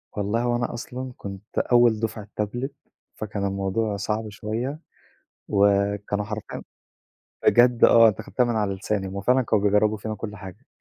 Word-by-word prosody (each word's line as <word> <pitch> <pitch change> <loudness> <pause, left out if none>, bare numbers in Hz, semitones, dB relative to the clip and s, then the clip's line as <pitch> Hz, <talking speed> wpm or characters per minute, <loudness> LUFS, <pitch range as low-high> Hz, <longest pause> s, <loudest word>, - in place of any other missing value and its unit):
والله 105 +3 -1
هو 120 0 +1
أنا 120 0 -2
أصلًا 125 +2 -6
كنت 100 +1 -9
أول 120 -3 +4
دُفعة 110 -2 -4
tablet 120 +6 -3 0.5
فكان 105 -2 -4
الموضوع 100 +2 -1
صعب 105 +2 -2
شوية 115 +8 -4 0.7
وكانوا 100 0 +1
حرفيًا 105 -1 -6 0.8
بجد 120 0 +5
آه، 115 -1 +8
أنتِ 100 - -2
أخدتيها 125 - 0
من 120 -1 -1
على 105 -2 0
لساني، 95 0 -2
هو 100 +1 -5
فعلًا 125 +6 +3
كانوا 110 -3 +1
بيجرّبوا 105 +1 +3
فينا 110 +1 -5
كلّ 105 0 -7
حاجة، 100 +5 -11
105 Hz, 155 wpm, -24 LUFS, 100-120 Hz, 0.8 s, آه